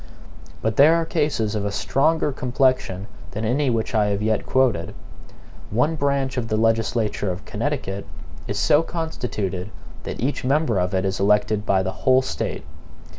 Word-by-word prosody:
But 110 -1 0
there 155 +4 +7
are 165 -1 +1
cases 145 - 0
of 105 -2 -1
a 100 - -1
stronger 150 +10 +1
complexion 130 -7 0 0.2
than 110 +1 -4
any 135 +5 +1
which 115 +1 -1
I 105 -2 +3
have 100 0 -1
yet 110 0 0
quoted. 105 -8 +1 0.7
One 125 +9 +1
branch 140 -3 0
of 120 -2 -1
the 110 - 0
legislature 115 -2 +1
of 90 +2 -7
Connecticut 105 - -3 0.4
is 105 - -3
so 150 +7 +4
constituted 110 - -4 0.3
that - - -6
each 135 +5 -1
member 130 -5 +2
of 90 +1 0
it 95 +1 +1
is 95 0 -1
elected 105 +1 +2
by 95 -1 +3
the 95 - -2
whole 130 +7 +3
State. 75 - -4
115 Hz, 165 wpm, -23 LUFS, 100-135 Hz, 0.7 s, there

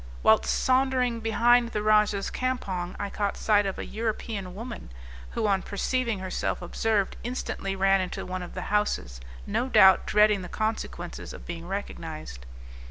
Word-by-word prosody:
Whilst 110 - +5
sauntering 255 -2 +2
behind 235 +2 +3
the 210 - -1
rajah's 210 -2 +3
campong 195 -9 -2
I 200 -1 -3
caught 205 -1 -2
sight 205 -2 +3
of 195 - -3
an - - -7
European 215 -4 -3
woman, 230 - -7 0.5
who 225 - +1
on 195 -2 +2
perceiving 230 +3 -1
herself 185 -1 -2
observed, 200 +3 -1
instantly 230 -5 -3
ran 195 0 +3
into 185 - -4
one 185 0 -4
of 175 - -8
the 185 - -3
houses, - - 0 0.2
no 255 - -1
doubt 190 -6 +6
dreading 210 -1 +4
the 180 - -8
consequences 215 -5 -4
of - - -11
being 170 0 -6
recognized. 155 - -6
205 Hz, 155 wpm, -27 LUFS, 185-225 Hz, 0.5 s, doubt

